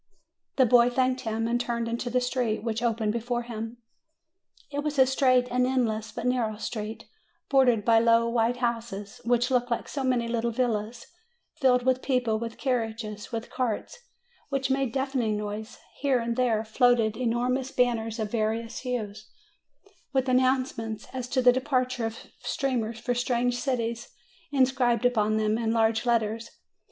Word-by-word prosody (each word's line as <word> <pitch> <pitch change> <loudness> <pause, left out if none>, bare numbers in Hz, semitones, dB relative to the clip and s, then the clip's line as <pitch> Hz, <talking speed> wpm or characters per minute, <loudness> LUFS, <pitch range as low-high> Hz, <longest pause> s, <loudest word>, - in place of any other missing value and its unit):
The 260 - +5
boy 240 0 +5
thanked 255 +1 +1
him, 225 -1 -2
and 240 +1 +1
turned 235 -1 -2
into 235 +1 -3
the 250 +1 +2
street 245 -4 -1
which 230 -1 -2
opened 225 -3 0
before 240 +1 -2
him. 225 0 -6 0.9
It 285 - -2
was 295 0 -2
a 265 - +7
straight 255 -1 +3
and 250 0 +2
endless 220 -4 0
but 225 - -6
narrow 240 -4 0
street, 220 0 -5 0.5
bordered 250 -6 +4
by 230 -1 +6
low 230 0 +4
white 235 +1 +1
houses, 230 -4 -3
which 245 +1 +2
looked 245 -1 +2
like 235 - -2
so 275 - -4
many 250 -2 +1
little 235 0 0
villas, 230 -2 -2 0.5
filled 250 -2 +4
with 260 0 +2
people, 245 -5 0
with 230 0 -5
carriages, 225 -5 -3
with 230 -1 -5
carts 250 - -3 0.5
which 275 -1 -1
made 270 -1 +1
a - - -15
deafening 265 -5 0
noise; 210 +2 -5 0.2
here 275 -2 +2
and 235 -1 -2
there 230 -3 +1
floated 230 -1 +3
enormous 250 +2 0
banners 230 -3 0
of 215 -2 -3
various 225 +1 -1
hues, 215 -5 -4 0.8
with 265 -2 +1
announcements 255 -4 +1
as 255 -2 -4
to 255 +1 0
the 245 0 +7
departure 255 -3 0
of 225 0 -9
steamers 240 -6 -2
for 245 +1 -1
strange 245 0 0
cities 235 -3 -2 0.4
inscribed 255 -4 +2
upon 215 -3 +2
them 215 +1 +1
in 225 -1 0
large 225 0 +2
letters. 230 -1 0
240 Hz, 160 wpm, -27 LUFS, 225-255 Hz, 0.9 s, a